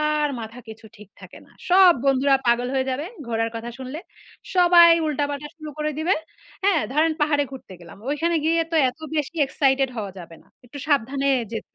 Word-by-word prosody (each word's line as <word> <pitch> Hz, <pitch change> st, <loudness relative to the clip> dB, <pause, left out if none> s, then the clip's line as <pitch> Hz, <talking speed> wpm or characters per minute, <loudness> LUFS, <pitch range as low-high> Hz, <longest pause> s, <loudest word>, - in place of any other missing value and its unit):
আর 300 Hz, -1 st, +1 dB
মাথা 225 Hz, +2 st, -9 dB
কিছু 220 Hz, 0 st, -11 dB
ঠিক 210 Hz, -2 st, -15 dB
থাকে -, -, -12 dB
না। -, -, -24 dB, 0.2 s
সব 370 Hz, -1 st, +7 dB
বন্ধুরা 275 Hz, +1 st, +3 dB
পাগল 240 Hz, +1 st, +2 dB
হয়ে 265 Hz, 0 st, 0 dB
যাবে 285 Hz, +5 st, -3 dB, 0.2 s
ঘোরার 225 Hz, 0 st, -1 dB
কথা 235 Hz, +1 st, -6 dB
শুনলে। 260 Hz, +4 st, -7 dB, 0.6 s
সবাই 345 Hz, -1 st, +7 dB, 0.2 s
উল্টাপাল্টা 290 Hz, 0 st, -3 dB
শুরু 310 Hz, -1 st, -8 dB
করে 305 Hz, 0 st, -1 dB
দিবে। 340 Hz, +5 st, +1 dB, 0.5 s
হ্যাঁ? 390 Hz, -6 st, +3 dB
ধরেন 315 Hz, +2 st, +2 dB
পাহাড়ে 290 Hz, -1 st, +2 dB
ঘুরতে 225 Hz, -8 st, -10 dB
গেলাম। 170 Hz, +1 st, -13 dB
ওইখানে 330 Hz, +3 st, 0 dB
গিয়ে 330 Hz, +1 st, +2 dB
তো -, -, +2 dB
এত 275 Hz, -, -24 dB, 0.2 s
বেশি 300 Hz, +3 st, -3 dB
excited 270 Hz, -1 st, +1 dB
হওয়া 205 Hz, -3 st, -5 dB
যাবে 170 Hz, -2 st, -11 dB
না। -, -, -29 dB, 0.2 s
একটু 285 Hz, +4 st, -10 dB
সাবধানে 275 Hz, 0 st, +1 dB, 0.2 s
যেতে 225 Hz, -, -7 dB
280 Hz, 185 wpm, -23 LUFS, 240-310 Hz, 0.6 s, সব